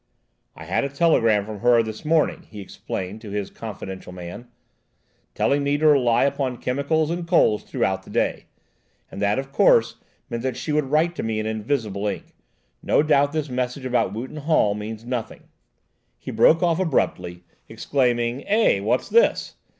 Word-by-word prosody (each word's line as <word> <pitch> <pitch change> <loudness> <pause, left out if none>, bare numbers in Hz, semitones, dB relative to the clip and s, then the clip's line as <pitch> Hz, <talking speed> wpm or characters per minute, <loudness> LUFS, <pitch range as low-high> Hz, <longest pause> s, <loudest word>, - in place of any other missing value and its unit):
"I - - -10
had - - 0
a 140 - -2
telegram 115 -9 +2
from 105 -1 -7
her 120 0 +4
this 110 -1 -7
morning," 155 0 +1
he 105 - -10
explained 95 +1 -6
to 110 - -9
his 100 -1 -4
confidential 95 -4 -8
man, 90 +6 -9 0.9
"telling 140 +1 +1
me 140 +1 +1
to 155 - -1
rely 125 -6 +4
upon 135 -3 -1
chemicals 145 +6 0
and 170 0 -4
coals 140 - +3
throughout 95 0 -1
the - - -16
day, - - -1 0.7
and - - -7
that, 100 +2 +1
of 135 0 -4
course, 115 -4 +3 0.3
meant 115 - -4
that 130 -1 -3
she 155 - -4
would 150 -1 +1
write 155 +5 +1
to - - -2
me 110 -1 -2
in 110 - -3
invisible 110 -2 -2
ink. 100 - -5 0.5
No - - +2
doubt 145 -2 +3
this 155 -1 -2
message 125 +1 -3
about 125 -6 +1
Wootton 125 +8 -6
Hall 150 -9 +2
means 105 +2 -7
nothing—" 125 -2 -5 0.7
He - - -7
broke 165 +2 +4
off 170 -1 +2
abruptly, 90 - -1 0.3
exclaiming: 120 +1 0
"Eh! 210 - +3
what's 110 +6 0
this!" 470 +1 +2
125 Hz, 170 wpm, -23 LUFS, 105-145 Hz, 0.9 s, her